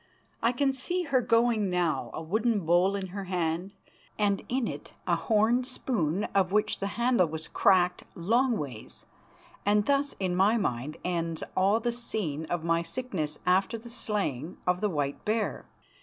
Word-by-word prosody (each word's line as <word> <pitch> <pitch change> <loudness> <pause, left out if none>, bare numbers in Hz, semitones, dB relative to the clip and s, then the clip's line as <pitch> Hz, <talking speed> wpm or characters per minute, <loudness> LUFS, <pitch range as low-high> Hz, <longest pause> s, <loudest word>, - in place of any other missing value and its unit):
I 230 - +3
can 270 +2 +1
see 350 +8 -2
her 275 -5 +2
going 230 -3 +2
now, 175 -3 0
a - - -6
wooden 215 +5 +1
bowl 175 +4 +3
in 190 -2 -4
her 195 +1 -5
hand, 180 +1 -2 0.4
and 200 -2 +1
in 255 -1 0
it - - -7
a - - +2
horn 225 +3 +2
spoon 210 - -1
of 190 -2 +2
which 210 +1 +1
the 195 - -1
handle 235 -6 +3
was 160 0 -5
cracked 180 -2 +3
longways, 190 - -1 0.6
and 205 0 +3
thus 280 +1 +1
in 185 -2 0
my 200 +5 +4
mind 140 - -2
ends 165 -2 -2
all 195 +4 +3
the 240 +1 -1
scene 190 -10 -3
of 170 0 -2
my 165 0 +2
sickness 170 -5 -4
after 190 +5 +2
the 235 +1 -11
slaying 185 - -3
of 180 0 +1
the 210 - +2
white 145 -5 -2
bear. 215 0 -1
195 Hz, 165 wpm, -28 LUFS, 170-230 Hz, 0.6 s, my